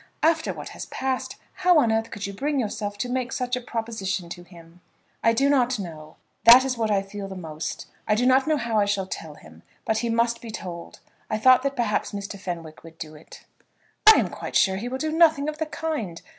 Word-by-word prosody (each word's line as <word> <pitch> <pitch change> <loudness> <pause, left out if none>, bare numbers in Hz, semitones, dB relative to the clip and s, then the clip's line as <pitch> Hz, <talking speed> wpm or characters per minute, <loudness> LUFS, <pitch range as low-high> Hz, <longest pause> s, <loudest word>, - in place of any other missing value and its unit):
After 320 0 +2
what - - -8
has - - -8
passed, 265 -1 -3 0.2
how 360 -2 +3
on 235 -7 +4
earth 225 0 0
could 205 - -6
you 200 - -5
bring 285 +7 -1
yourself 210 -3 -3
to 245 - -2
make 255 +1 -2
such 250 -2 -1
a 250 - -4
proposition 220 -7 -4
to 175 - -8
him?" 175 -1 -16 0.4
"I 230 - +5
do 270 +5 +2
not 255 -3 +2
know; 155 -5 -8 0.3
that 245 +3 +9
is 260 -1 -1
what 225 -2 -1
I 200 -2 +2
feel 195 0 -7
the 195 - -8
most. 155 -3 -6 0.2
I 210 - +3
do 245 +3 +1
not 260 +3 +4
know 310 -1 +2
how 230 -4 0
I 205 - +3
shall 200 -1 0
tell 160 -5 -7
him. 80 - -16 0.2
But 220 0 +1
he 235 - -2
must 235 0 +1
be 235 - -8
told. 175 -5 -8 0.3
I 215 - 0
thought 255 +3 +6
that 275 +1 -2
perhaps 230 -6 -1
Mr. 200 0 -6
Fenwick 170 -4 -7
would 165 0 -14
do 155 -1 -8
it." 155 +1 -15 0.7
"I - - +5
am - - +1
quite - - -7
sure 190 -1 +4
he 235 +5 -4
will 260 - -3
do 310 +3 -2
nothing 315 -3 +4
of 305 0 -4
the 315 - -1
kind. 295 - -4
225 Hz, 230 wpm, -24 LUFS, 190-260 Hz, 0.7 s, that